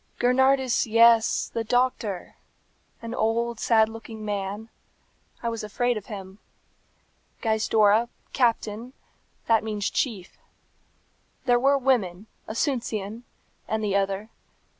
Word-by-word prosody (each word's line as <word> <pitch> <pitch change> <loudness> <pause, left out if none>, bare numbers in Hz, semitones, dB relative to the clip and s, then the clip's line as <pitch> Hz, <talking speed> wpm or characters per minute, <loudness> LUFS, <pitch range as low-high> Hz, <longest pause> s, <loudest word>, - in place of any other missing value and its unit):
"Gernardus, 260 0 +3
yes, 230 0 +4
the 230 - -1
doctor. 235 -5 -1 0.7
An 230 0 -5
old, 235 0 0
sad 220 -2 +4
looking 225 -1 -9
man. 205 +2 -4 0.7
I 235 - 0
was 230 -1 -4
afraid 245 +4 0
of 210 -2 -7
him. 195 -2 -8 1.0
Gaizdorra, 220 0 +3 0.2
Captain, 235 -1 0 0.5
that 225 -1 +3
means 210 -2 -2
chief. 205 -9 -3 1.1
There 245 -1 +4
were 275 +2 +4
women, 220 -8 0 0.2
Asuncion, 230 -3 -2 0.4
and 220 0 -1
the 200 -2 0
other. 195 +2 -1
225 Hz, 105 wpm, -25 LUFS, 210-240 Hz, 1.1 s, yes